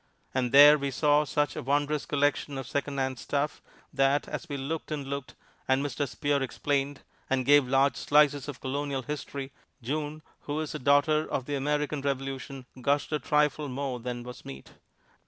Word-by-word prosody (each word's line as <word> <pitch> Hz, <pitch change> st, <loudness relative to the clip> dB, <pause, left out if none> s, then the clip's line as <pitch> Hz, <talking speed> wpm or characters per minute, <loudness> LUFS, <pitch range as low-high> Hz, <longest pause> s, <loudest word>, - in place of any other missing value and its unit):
And 125 Hz, -2 st, 0 dB
there 145 Hz, +2 st, +9 dB
we 140 Hz, 0 st, -1 dB
saw 150 Hz, +2 st, +3 dB
such 145 Hz, -1 st, 0 dB
a -, -, -4 dB
wondrous 145 Hz, +2 st, 0 dB
collection 145 Hz, -1 st, 0 dB
of 135 Hz, -, -5 dB
secondhand 135 Hz, -1 st, -2 dB
stuff 145 Hz, +1 st, -2 dB, 0.3 s
that, 135 Hz, +1 st, +2 dB
as -, -, -6 dB
we 140 Hz, -, -3 dB
looked 150 Hz, +4 st, -4 dB
and 150 Hz, -3 st, -3 dB
looked, 140 Hz, -1 st, -5 dB, 0.3 s
and 130 Hz, +2 st, +2 dB
Mr. 145 Hz, +1 st, -2 dB
Spear 145 Hz, +2 st, 0 dB
explained, 140 Hz, +2 st, -1 dB, 0.3 s
and 130 Hz, -1 st, +1 dB
gave 145 Hz, -1 st, +6 dB
large 135 Hz, +2 st, +3 dB
slices 145 Hz, -2 st, +3 dB
of 145 Hz, -3 st, -7 dB
Colonial 140 Hz, 0 st, -2 dB
history, 140 Hz, -1 st, -5 dB, 0.3 s
June, 150 Hz, +4 st, -3 dB, 0.2 s
who 145 Hz, +1 st, -4 dB
is 155 Hz, -1 st, -4 dB
a 150 Hz, -, -4 dB
Daughter 145 Hz, +3 st, +3 dB
of 130 Hz, -, -1 dB
the 145 Hz, -, -4 dB
American 150 Hz, +1 st, -1 dB
Revolution, 135 Hz, -1 st, -4 dB, 0.2 s
gushed 140 Hz, +4 st, +1 dB
a 150 Hz, -, 0 dB
trifle 150 Hz, +1 st, +1 dB
more 130 Hz, -1 st, -3 dB
than 120 Hz, 0 st, -5 dB
was 125 Hz, 0 st, -10 dB
meet. 65 Hz, 0 st, -10 dB
140 Hz, 175 wpm, -28 LUFS, 135-145 Hz, 0.3 s, there